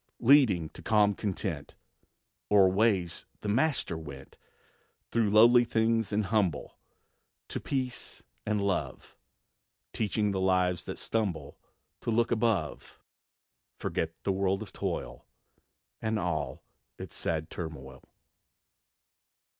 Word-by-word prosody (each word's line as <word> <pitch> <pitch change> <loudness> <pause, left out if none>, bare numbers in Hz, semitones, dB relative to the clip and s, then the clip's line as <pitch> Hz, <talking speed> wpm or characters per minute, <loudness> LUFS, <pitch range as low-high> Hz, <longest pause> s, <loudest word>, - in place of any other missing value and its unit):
Leading 115 - +5
to - - -12
calm 105 -2 +3
content, 95 -6 -4 0.7
O'er 100 -2 +6
ways 95 -4 +1
the - - -5
Master 130 - +1
went, 70 -4 -9 0.8
Through 115 -3 +2
lowly 120 +4 +7
things 115 -1 +1
and 105 0 +1
humble, 95 -7 -1 0.7
To - - -3
peace 130 -3 -4 0.2
and 105 -1 0
love; 100 -2 -2 0.8
Teaching 105 -1 0
the 95 -1 -1
lives 90 -1 +1
that - - -5
stumble 105 -7 -3 0.4
To - - -5
look 115 +1 +2
above, 110 -8 -1 0.8
Forget 80 0 -3
the 100 - +1
world 95 0 0
of - - -12
toil - - -4 0.7
And 110 0 0
all 80 -8 -2 0.3
its - - -8
sad 80 -1 -3
turmoil. 75 -6 -7
100 Hz, 110 wpm, -29 LUFS, 85-110 Hz, 0.8 s, lowly